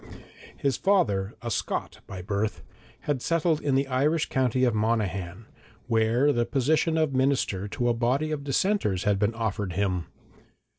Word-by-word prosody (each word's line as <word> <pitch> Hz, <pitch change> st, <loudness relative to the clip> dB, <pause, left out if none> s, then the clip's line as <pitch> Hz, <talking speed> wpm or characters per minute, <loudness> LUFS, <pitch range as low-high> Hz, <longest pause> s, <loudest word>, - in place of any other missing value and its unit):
His 140 Hz, -4 st, 0 dB
father, 105 Hz, -, +1 dB
a 120 Hz, -, -3 dB
Scot 90 Hz, -1 st, -3 dB
by 95 Hz, -2 st, -7 dB
birth, 100 Hz, +2 st, -2 dB, 0.4 s
had 145 Hz, -4 st, -2 dB
settled 165 Hz, 0 st, +1 dB
in 140 Hz, -2 st, +1 dB
the 135 Hz, +1 st, +2 dB
Irish 145 Hz, +5 st, +1 dB
county 130 Hz, -1 st, +1 dB
of 120 Hz, -3 st, +3 dB
Monaghan, 105 Hz, -3 st, -1 dB, 0.4 s
where 115 Hz, +5 st, +2 dB
the 120 Hz, -, +1 dB
position 155 Hz, +6 st, +1 dB
of 155 Hz, -3 st, +1 dB
minister 130 Hz, -7 st, +1 dB
to 120 Hz, +4 st, -2 dB
a 120 Hz, -, +3 dB
body 130 Hz, +7 st, 0 dB
of 150 Hz, -2 st, -3 dB
dissenters 140 Hz, -, 0 dB
had 100 Hz, -1 st, +1 dB
been 105 Hz, +2 st, +1 dB
offered 105 Hz, -5 st, -2 dB
him. 95 Hz, -2 st, -1 dB
120 Hz, 155 wpm, -26 LUFS, 100-140 Hz, 0.4 s, of